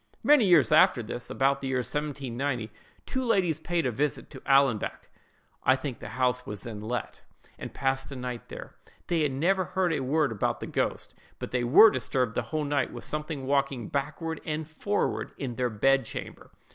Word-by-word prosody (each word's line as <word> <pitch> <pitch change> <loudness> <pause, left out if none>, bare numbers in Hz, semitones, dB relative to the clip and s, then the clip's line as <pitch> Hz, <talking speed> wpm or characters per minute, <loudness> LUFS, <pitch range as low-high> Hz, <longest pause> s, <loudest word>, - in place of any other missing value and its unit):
"Many 290 -6 +6
years 170 -6 +5
after 120 - +5
this, 120 +2 -6
about 135 +1 +1
the 135 - -3
year 130 -1 0
1790, 130 -3 -3 0.3
two 260 - -2
ladies 185 - +1
paid 170 0 -1
a 125 - +1
visit 145 +5 -2
at - - -10
Allanbank—I 135 -1 0
think 130 -2 -5
the - - -8
house 125 -1 +1
was 105 -5 -6
then 110 -3 -7
let—and 115 +2 -7
passed 135 +1 -1
a - - -6
night 125 -2 -6
there. - - -9 0.4
They 170 -2 +2
had 150 -2 +1
never 180 +8 +1
heard 185 -1 0
a - - 0
word 140 +1 +1
about 105 - -1
the - - -5
ghost; - - -2 0.2
but - - -6
they 125 -1 0
were 165 - +8
disturbed 125 -5 -1
the - - 0
whole 155 -1 -1
night 140 -3 0
with 120 - -8
something 150 -2 -4
walking 140 -4 0
backward 155 +4 -3
and 155 0 -3
forward 200 +6 -2
in 130 -3 -4
their 125 +1 -1
bed 135 +5 +3
chamber. - - -7
135 Hz, 185 wpm, -28 LUFS, 125-155 Hz, 0.4 s, were